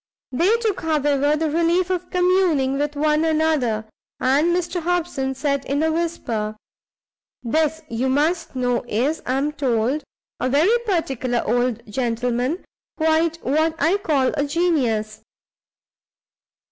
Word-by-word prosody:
They 360 - +3
took, 445 -4 -1
however, 295 -2 +1
the 310 0 -1
relief 340 +3 +1
of 360 -1 -2
communing 355 -7 +2
with 295 0 -1
one 300 +1 +2
another, 310 -9 +1 0.3
and 275 +5 +3
Mr 350 0 0
Hobson 325 -6 -1
said 280 0 -1
in 285 +3 0
a 320 - +2
whisper 240 -11 -2 0.9
"This, 315 +6 0
you 240 +3 -1
must 320 +4 0
know, 245 -1 0
is, 265 +10 0
I 255 - +1
am 290 +2 0
told, 265 0 0 0.4
a 255 - 0
very 315 - +4
particular 265 - 0
old 240 0 0
gentleman; 245 - -1 0.3
quite 320 +1 +2
what 315 +4 +1
I 330 +7 +3
call 290 -9 +1
a 285 - 0
genius. 255 -10 0
295 Hz, 130 wpm, -22 LUFS, 255-330 Hz, 0.9 s, very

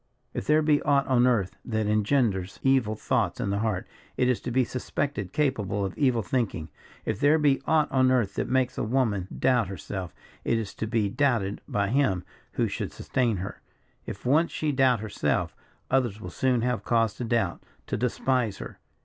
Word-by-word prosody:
If 100 - -4
there 155 +1 +4
be 150 -1 +3
aught 140 -1 +2
on 125 -1 +3
earth 105 -7 +1
that 110 -2 -1
engenders 105 -3 +1
evil 130 -5 +3
thoughts - - 0
in 100 - -1
the 100 - 0
heart, 110 -4 -1 0.3
it 125 - +3
is 125 - +1
to - - -4
be 130 +2 +2
suspected 125 -4 -3
capable 105 -9 0
of 95 - -5
evil 125 -5 +2
thinking. 100 -10 -2 0.4
If 110 -2 -2
there 145 +2 +5
be 145 -3 +2
aught 155 -2 +3
on 130 -1 +4
earth 120 -6 +2
that - - -2
makes 130 -1 +1
a - - 0
woman 110 -5 0
doubt 125 -5 +2
herself, 95 0 -6 0.3
it 115 - +1
is 110 -3 -4
to 110 - -4
be 110 -2 +1
doubted 115 -4 0
by 100 -1 0
him 110 -8 +1 0.3
who - - +1
should - - -4
sustain 120 -5 0
her; 95 +2 -6 0.5
if 100 - -7
once 155 +7 +3
she 155 -1 -1
doubt 130 -5 +3
herself, 75 - -1 0.4
others 120 -6 +1
will 90 -4 -7
soon 125 +3 +1
have 125 -1 -1
cause 115 -3 +2
to - - -4
doubt, 115 -6 0 0.2
to - - -2
despise 125 -2 0
her. - - -9
115 Hz, 190 wpm, -27 LUFS, 100-130 Hz, 0.5 s, there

